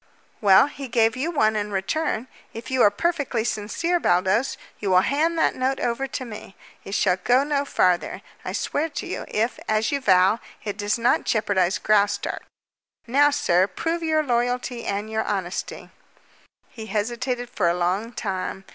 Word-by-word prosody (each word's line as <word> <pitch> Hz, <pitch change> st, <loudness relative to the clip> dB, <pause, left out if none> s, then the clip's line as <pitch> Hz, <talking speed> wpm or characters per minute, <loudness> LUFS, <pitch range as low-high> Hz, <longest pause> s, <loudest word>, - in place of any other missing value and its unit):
"Well, 195 Hz, 0 st, +7 dB
he 280 Hz, -1 st, -7 dB
gave 230 Hz, -1 st, +2 dB
you 275 Hz, +6 st, -2 dB
one 220 Hz, -10 st, +2 dB
in 210 Hz, 0 st, -2 dB
return. 215 Hz, -, -1 dB, 0.3 s
If 230 Hz, +3 st, -7 dB
you 260 Hz, -1 st, +2 dB
are -, -, +7 dB
perfectly 275 Hz, -1 st, -1 dB
sincere, 240 Hz, +11 st, -1 dB
Baldos, 190 Hz, -, +1 dB, 0.2 s
you 200 Hz, -, -2 dB
will 185 Hz, 0 st, +5 dB
hand 315 Hz, -, +1 dB
that -, -, +2 dB
note 260 Hz, +1 st, -1 dB
over 245 Hz, +3 st, -1 dB
to 260 Hz, -1 st, -5 dB
me. 210 Hz, -4 st, -10 dB, 0.3 s
It 195 Hz, -, -5 dB
shall 185 Hz, -2 st, +2 dB
go 245 Hz, +8 st, +3 dB
no 285 Hz, -1 st, 0 dB
farther, 180 Hz, -9 st, +1 dB, 0.2 s
I -, -, -4 dB
swear 315 Hz, +3 st, -1 dB
to -, -, -5 dB
you, -, -, -5 dB
if, 225 Hz, +3 st, -1 dB
as 215 Hz, 0 st, +1 dB
you 280 Hz, -1 st, -1 dB
vow, 190 Hz, 0 st, +4 dB, 0.2 s
it 205 Hz, -2 st, -4 dB
does 205 Hz, +2 st, -1 dB
not 235 Hz, +1 st, +2 dB
jeopardize 190 Hz, -4 st, +1 dB
Graustark. 205 Hz, 0 st, +1 dB, 0.6 s
Now, 280 Hz, +4 st, +4 dB
sir, 190 Hz, -10 st, +2 dB
prove 330 Hz, -, -3 dB
your 315 Hz, -1 st, +1 dB
loyalty 245 Hz, -1 st, -1 dB
and 200 Hz, +2 st, -2 dB
your 220 Hz, 0 st, -1 dB
honesty." 190 Hz, -3 st, -4 dB, 0.8 s
He 220 Hz, -2 st, -10 dB
hesitated 240 Hz, +4 st, -2 dB
for 175 Hz, -4 st, +1 dB
a 170 Hz, -, 0 dB
long 185 Hz, +6 st, -1 dB
time. 190 Hz, -3 st, -4 dB
225 Hz, 170 wpm, -24 LUFS, 200-270 Hz, 0.8 s, Well